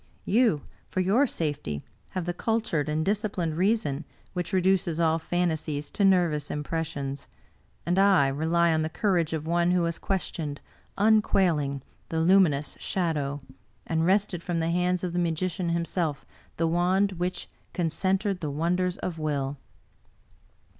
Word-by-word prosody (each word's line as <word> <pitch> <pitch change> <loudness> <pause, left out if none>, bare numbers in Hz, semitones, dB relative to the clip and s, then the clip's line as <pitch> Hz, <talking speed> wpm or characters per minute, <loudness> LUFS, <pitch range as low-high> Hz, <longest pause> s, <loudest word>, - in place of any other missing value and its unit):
You, 215 - +3 0.2
for - - -3
your 210 +10 +3
safety, 145 - -3 0.3
have 180 - -1
the 175 - -1
cultured 215 -7 -1
and 155 +1 0
dis 205 +1 +1
ciplined 180 -7 -2
reason 185 -6 +1 0.3
which 180 0 -3
reduces 185 -3 +2
all 165 -1 +3
fantasies 160 -4 -2
to 205 - 0
nervous 175 -6 +3
im 150 - -3
pressions; 145 -4 -4 0.6
and 175 +2 +2
I 195 -8 +5
rely 165 +4 +2
on 160 - +1
the 155 - -1
courage 175 -4 +1
of 160 -1 -3
one 170 +1 +2
who 180 -1 +3
has 170 0 -2
questioned, 160 -6 -3 0.4
unquailing, 180 -10 +2 0.3
the 160 - -1
Luminous 165 -4 +3
Shadow, 145 -6 -1 0.4
and 160 0 0
wrested 190 -1 +2
from 170 -1 -2
the 165 +1 0
hand 180 +1 +1
of 180 -2 -2
the 175 - 0
magician 170 +1 -1
himself 170 -3 -1 0.3
the 165 - +1
wand 180 +4 +2
which 180 +1 -2 0.2
con 170 -3 -1
centered 190 +3 0
the 155 - -3
wonders 175 +5 0
of 165 -3 -4
will!" 145 -2 -2
170 Hz, 150 wpm, -27 LUFS, 155-185 Hz, 0.6 s, I